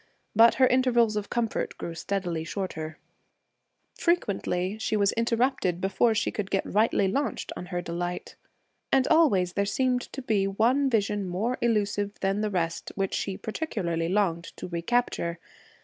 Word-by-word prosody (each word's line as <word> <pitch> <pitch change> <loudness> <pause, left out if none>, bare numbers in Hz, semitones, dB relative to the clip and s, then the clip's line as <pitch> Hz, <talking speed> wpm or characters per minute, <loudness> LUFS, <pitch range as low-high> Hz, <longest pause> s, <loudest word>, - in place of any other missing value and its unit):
But 230 +2 +7
her 260 - +5
intervals 245 -4 +3
of 210 -1 -3
comfort 235 -2 -2
grew 170 - -5
steadily 175 -2 -2
shorter; 160 -4 -5 1.0
frequently 200 - 0
she 220 - 0
was 200 -1 +3
interrupted 230 -6 +1
before 210 +5 +2
she 220 - 0
could 200 -2 -4
get 195 - 0
rightly 210 -1 +2
launched 275 +9 -2
on 180 - -7
her 175 -1 -3
delight. 175 +1 -4 0.6
And 270 -1 +4
always 195 - +4
there 200 - +1
seemed 250 +4 +1
to 270 - -6
be 205 -5 +1
one 245 +8 +2
vision 205 -4 0
more 215 +8 -1
illusive 205 -3 0
than 195 +2 +1
the 215 - 0
rest 170 -4 -2
which 195 -1 -1
she 190 -2 -2
particularly 180 - -2
longed 180 -4 +1
to - - -6
recapture. 170 -1 -1
205 Hz, 150 wpm, -27 LUFS, 180-235 Hz, 1.0 s, But